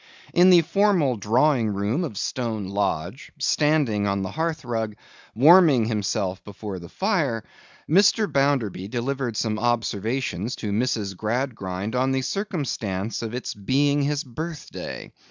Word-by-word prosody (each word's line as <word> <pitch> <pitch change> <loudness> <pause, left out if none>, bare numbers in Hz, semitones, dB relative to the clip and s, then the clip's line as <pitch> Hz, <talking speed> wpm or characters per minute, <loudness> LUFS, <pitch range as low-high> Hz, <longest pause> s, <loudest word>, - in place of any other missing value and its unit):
In 180 +2 +6
the 175 -2 +7
formal 175 -6 +2
drawing 120 +4 +2
room 105 - 0
of 120 - -5
Stone 110 -2 -3
Lodge, 100 - -2
standing 145 -10 +1
on 100 0 0
the 95 - -4
hearthrug, 120 -10 -2 0.4
warming 150 -2 +6
himself 105 -3 -2
before 100 -1 -7
the 85 - -11
fire, 155 - 0 0.4
Mr. 205 +6 +4
Bounderby 135 - 0
delivered 125 0 -2
some 110 -1 -1
observations 115 -1 -1
to 105 - -4
Mrs. 105 -3 -1
Gradgrind 110 -2 -3
on 130 +1 +1
the 130 0 0
circumstance 120 - -3
of 115 0 -4
its 125 - -4
being 140 +8 +1
his 145 +1 0
birthday. 155 +5 -7
120 Hz, 130 wpm, -24 LUFS, 105-145 Hz, 0.4 s, the